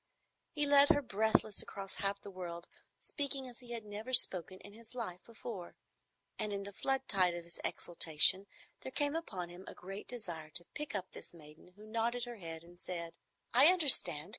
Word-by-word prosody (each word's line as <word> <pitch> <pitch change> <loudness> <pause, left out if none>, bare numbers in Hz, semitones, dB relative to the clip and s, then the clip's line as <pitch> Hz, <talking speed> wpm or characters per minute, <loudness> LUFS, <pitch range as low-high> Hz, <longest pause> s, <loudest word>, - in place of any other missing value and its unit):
He 295 -3 -1
led 285 0 +5
her 290 -3 +3
breathless 220 -1 +1
across 195 -1 -7
half 200 0 -1
the 200 - -9
world, 175 -2 -8 0.3
speaking 275 -2 -3
as 245 -1 -10
he 245 -2 -16
had 230 -2 -7
never 210 +5 -8
spoken 185 -5 +5
in 205 - -14
his 230 +2 -11
life 185 -8 -5
before. 220 -5 -9 0.6
And 210 - -3
in 200 0 -4
the 200 0 -9
flood 270 +4 +1
tide 185 -4 +2
of 175 - -7
his 170 0 -9
exaltation 175 +3 +3 0.3
there 260 - -9
came 290 +2 0
upon 190 - -5
him 175 +2 -12
a - - -10
great 195 +3 -9
desire 170 -10 -7
to 175 - +5
pick 300 -6 -6
up 190 -2 -5
this - - -10
maiden 155 +3 -17
who 210 +1 -15
nodded 230 +2 -2
her 240 -1 -7
head 165 -3 -9
and 175 +1 -17
said, 170 -2 -7 0.4
"I 260 +5 +8
understand. 260 - +6
205 Hz, 190 wpm, -33 LUFS, 175-245 Hz, 0.6 s, I